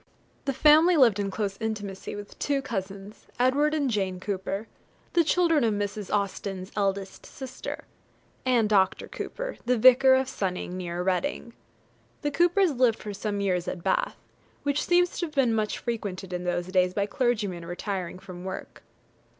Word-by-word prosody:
The 275 - 0
family 310 +5 +6
lived 230 -8 +5
in 200 -1 -1
close 195 0 -3
intimacy 205 -4 -4
with 205 0 -10
two 280 -1 0
cousins, 200 -4 -6
Edward 285 +5 +3
and 290 -3 +1
Jane 190 -6 -1
Cooper, 195 +2 -3 0.5
the 340 - +5
children 330 -3 +3
of 220 -2 +2
Mrs. 205 0 -3
Austen's 195 -1 -2
eldest 195 -1 -2
sister, 260 -1 -7 0.6
and 245 -4 +3
Dr. 195 -3 +2
Cooper, - - -5
the 250 0 +3
vicar 255 +3 +7
of 265 0 +2
Sonning, 185 -7 -3
near 175 -1 -3
Reading. 230 +5 -1 0.7
The 290 - 0
Coopers 350 +3 +3
lived 250 -4 +3
for 210 - -6
some 205 0 -3
years 180 -3 0
at 175 - -4
Bath, 190 - 0 0.5
which 285 0 0
seems 355 0 +2
to 345 - -1
have 305 - -15
been 255 -4 +3
much 215 -1 0
frequented 200 -5 -4
in 180 0 -3
those 175 0 -1
days 185 -1 +2
by 200 - +1
clergymen 210 -7 -1
retiring 180 +1 -4
from 185 -1 -10
work. 190 0 -7
210 Hz, 160 wpm, -27 LUFS, 190-265 Hz, 0.7 s, vicar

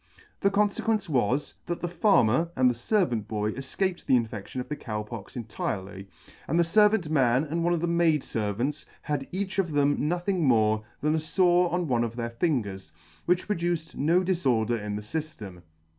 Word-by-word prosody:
The 200 - +3
con 205 +1 +3
fequence 215 +1 -1
was, 130 -1 0
that 175 - -2
the 175 - -2
Farmer 170 - +3
and 130 0 +4
the 125 - +3
fervant 120 - 0
boy 105 -1 -1
efcaped 175 - -3
the - - +3
infection 115 0 -2
of 125 - -4
the 150 - -3
Cow 105 -6 -4
Pox 105 -2 -9
entirely, 100 -4 -5 0.4
and 160 - 0
the - - +6
fervant 210 0 +3
man 130 -3 +3
and 165 +2 -2
one 175 - +2
of 165 - -3
the - - +1
maid 170 -3 +2
fervants 115 +8 -2 0.2
had 145 -2 -2
each 195 +1 -3
of 170 -5 0
them 145 0 +2
nothing 175 +1 0
more 110 -5 +3 0.2
than 150 +1 +2
a 160 - +1
fore 175 +2 +3
on 175 -1 0
one 120 -3 +1
of 115 -1 -4
their 120 -1 -3
fingers, 105 - -2 0.4
which 180 +1 +2
produced 170 -4 -2
no 165 +6 +3
diforder 120 - +1
in 105 -1 -3
the 105 - -5
fyftem. 110 - -6
145 Hz, 190 wpm, -27 LUFS, 115-175 Hz, 0.4 s, the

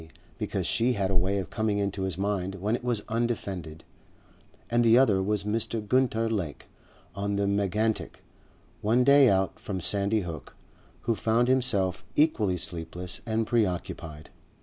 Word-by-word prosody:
because - - -2
she 125 +2 +2
had 95 -3 -1
a - - 0
way 95 +3 +1
of 95 -4 -4
coming 110 -2 0
into 100 -1 -2
his 95 -3 -2
mind 95 -1 -1
when 105 +4 -1
it 120 - -6
was 120 -4 -1
undefended; 100 -9 -3 0.8
and 120 0 +2
the 115 0 +6
other 110 -8 +4
was 105 +1 0
Mr. 110 +2 -1
Gunter 115 -2 +2
Lake 95 -10 -3 0.5
on 100 0 -2
the 100 0 +1
Megantic, 100 +2 -1 0.6
one 115 +4 +3
day 140 0 +6
out 95 0 +1
from 95 -3 -4
Sandy 100 +4 +1
Hook, 85 -4 -8 0.5
who 115 - 0
found 115 +2 +1
himself 105 -8 +1
equally 110 - +2
sleepless 85 +2 -5
and 110 0 0
preoccupied. 90 - -2
100 Hz, 150 wpm, -27 LUFS, 95-115 Hz, 0.8 s, the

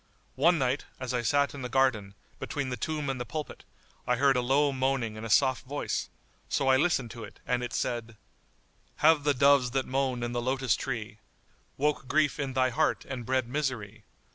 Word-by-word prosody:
One 170 0 +4
night, 130 0 0
as 130 -1 -4
I 125 - 0
sat 140 +5 +2
in 140 - -7
the 125 - -4
garden,[FN#80] 110 -6 -1
between 140 -4 -3
the 125 - -2
tomb 150 +1 -3
and 135 -2 -2
the - - 0
pulpit, 150 +4 -6 0.4
I 125 - +3
heard 135 +2 +3
a 125 - +2
low 140 +4 +2
moaning 130 -4 -1
in 110 - -8
a 115 - -5
soft 130 +4 +3
voice; 145 +2 -3 0.4
so 135 - +1
I 130 - +6
listened 135 -5 +1
to 115 0 -8
it - - -11
and 125 0 0
it 120 - -4
said, 115 -2 -3 0.9
"Have 155 -2 +5
the 145 -1 +3
doves 140 -1 +5
that 135 - 0
moan 130 -2 -1
in 120 - -2
the 120 0 -2
lotus 130 +1 +1
tree 110 -5 -5 0.3
* - - -37
Woke 145 -1 0
grief 150 +2 +2
in 135 -2 -2
thy 130 -1 +2
heart 155 +5 0
and 125 -4 -6
bred 130 -2 +1
misery? 120 -6 -3
130 Hz, 205 wpm, -29 LUFS, 120-140 Hz, 0.9 s, I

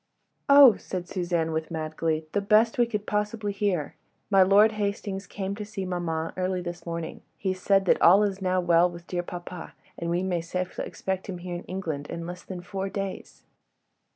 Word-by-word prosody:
"Oh!" 280 -6 +9
said 180 -2 -5
Suzanne, 175 -3 -1
with 160 0 -2
mad 155 -1 -4
glee, 160 -1 -1
"the 205 - 0
best 215 +4 +3
we 240 - +4
could 210 -3 -3
possibly 210 0 -1
hear. 195 -7 -1 0.4
My 195 -1 +6
Lord 200 +3 +6
Hastings 200 -2 -3
came 195 0 -4
to 210 +1 -5
see 205 -2 -5
maman 165 -3 -2
early 185 0 -1
this 175 0 -7
morning. 170 -1 -5 0.2
He 190 -2 -1
said 195 +1 +2
that - - +3
all 195 +5 +7
is 200 -1 -1
now 185 0 +1
well 175 0 +4
with 170 0 -11
dear 175 -1 -2
papa, 175 0 -8 0.2
and 170 - -3
we 175 +2 0
may 180 -3 0
safely 180 +2 -4
expect 190 +1 -4
him 185 - -4
here 175 0 -6
in 175 - -6
England 160 -6 -4
in 170 0 -5
less 180 +1 -7
than 180 -1 -7
four 195 +1 -4
days." 195 -1 -6
185 Hz, 195 wpm, -27 LUFS, 175-200 Hz, 0.4 s, Oh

